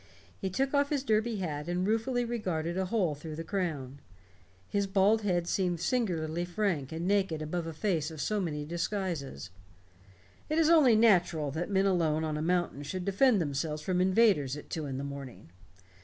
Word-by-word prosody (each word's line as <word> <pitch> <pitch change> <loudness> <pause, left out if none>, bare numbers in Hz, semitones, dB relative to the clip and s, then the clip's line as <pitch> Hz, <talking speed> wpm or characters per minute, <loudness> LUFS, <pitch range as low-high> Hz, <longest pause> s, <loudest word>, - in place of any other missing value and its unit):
He 190 - -2
took 270 +9 -1
off 285 0 +3
his 285 -3 0
derby 220 -2 +1
hat 155 -6 -4
and 180 +1 0
ruefully 240 +4 0
regarded 180 -8 -2
a 190 0 0
hole 185 -5 +1
through 150 +2 -8
the 165 - -5
crown. 155 -8 -3 0.7
His 200 -1 0
bald 200 +3 +3
head 180 -4 0
seemed 180 -3 0
singularly 170 -6 -1
frank 175 -6 -1
and 165 +2 -3
naked 195 -5 +1
above 165 +2 -3
a - - -3
face 160 -3 -1
of 160 -2 -9
so 210 +8 0
many 150 -5 -3
disguises. 170 - -3 1.0
"It 310 - 0
is 325 0 +4
only 285 -9 +6
natural 175 -9 +3
that 160 +7 -3
men 195 -1 +2
alone 165 -5 +2
on 155 -1 -2
a 150 - -2
mountain 175 -3 0
should 180 +5 -5
defend 205 +3 +4
themselves 150 0 -2
from 180 -1 0
invaders 185 - +3
at - - -12
two 155 -3 -3
in 135 -1 -4
the 135 - -4
morning. 140 -9 -8
175 Hz, 185 wpm, -30 LUFS, 155-205 Hz, 1.0 s, only